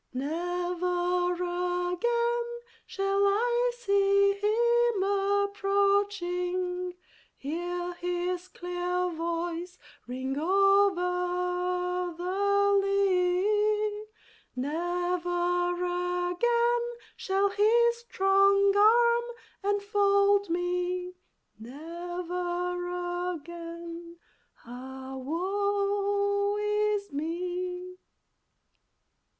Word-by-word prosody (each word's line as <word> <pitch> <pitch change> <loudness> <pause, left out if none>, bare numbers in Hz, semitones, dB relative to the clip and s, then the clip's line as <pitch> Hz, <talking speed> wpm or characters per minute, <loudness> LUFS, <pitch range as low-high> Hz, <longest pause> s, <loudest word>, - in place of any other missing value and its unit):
Never 355 +4 -1
again 360 +7 0 0.4
shall 390 0 0
I 480 +4 +2
see 400 -3 +3
him 470 +1 +2
approaching, 395 -3 0 0.4
Hear 350 +4 -4
his 355 +1 -3
clear 360 0 -2
voice 340 +2 -3 0.3
ring 260 +2 -3
over 360 -1 +1
the 400 +2 +2
lea; 400 +2 +1 0.5
Never 350 +4 -1 0.6
again 475 +4 +1 0.2
shall 390 +1 +1
his 465 +4 +3
strong 395 -2 +3
arm 470 -1 +2
enfold 405 -1 +2
me, 360 +1 -2 0.5
Never 355 +5 -4
again, 335 +1 -9 0.5
ah, 260 +2 -8
woe 405 +6 0
is 420 -3 0
me! 360 +4 -4
360 Hz, 60 wpm, -28 LUFS, 355-405 Hz, 0.6 s, see